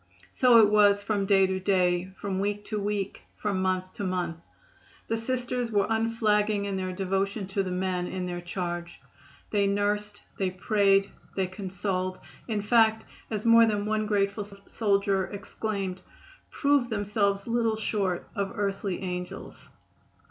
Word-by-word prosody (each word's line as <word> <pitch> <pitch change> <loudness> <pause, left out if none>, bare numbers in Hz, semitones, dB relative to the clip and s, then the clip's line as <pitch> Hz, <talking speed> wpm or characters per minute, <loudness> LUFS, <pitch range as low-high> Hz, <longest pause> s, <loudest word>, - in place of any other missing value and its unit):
So 250 -2 +5
it 210 -2 +6
was 205 -1 +5
from 200 -1 0
day 195 -1 +5
to 190 0 -1
day, 180 -2 +2
from 195 -2 -3
week 205 +1 -2
to 215 - -2
week, 200 -1 -2 0.2
from 200 -3 -1
month 185 0 -1
to - - -5
month. 180 -3 -2 0.7
The 225 - 0
Sisters 245 +1 -2
were 205 -3 +2
unflagging 215 -2 +1
in 200 -1 -2
their 185 -1 -2
devotion 195 +2 -1
to 195 0 0
the 190 - -3
men 180 -1 -1
in 185 0 -3
their 175 -1 -4
charge. 175 -1 -4 0.5
They 200 -2 +2
nursed, 205 +1 -1 0.2
they 190 -2 +1
prayed, 195 +1 +2 0.2
they 190 - +1
consoled, 185 0 -3 0.3
in 215 -3 -1
fact, 220 0 +4 0.2
as 215 -1 -3
more 230 0 +7
than 205 -2 0
one 215 0 0
grateful 200 0 0 0.2
soldier 200 -3 +1
exclaimed, 195 -2 -4 0.5
proved 280 -4 +2
themselves 205 -2 0
little 230 -1 +1
short 200 -4 -1
of 200 -2 -2
earthly 195 -2 -2
angels. 180 -1 -6
200 Hz, 150 wpm, -27 LUFS, 190-215 Hz, 0.7 s, more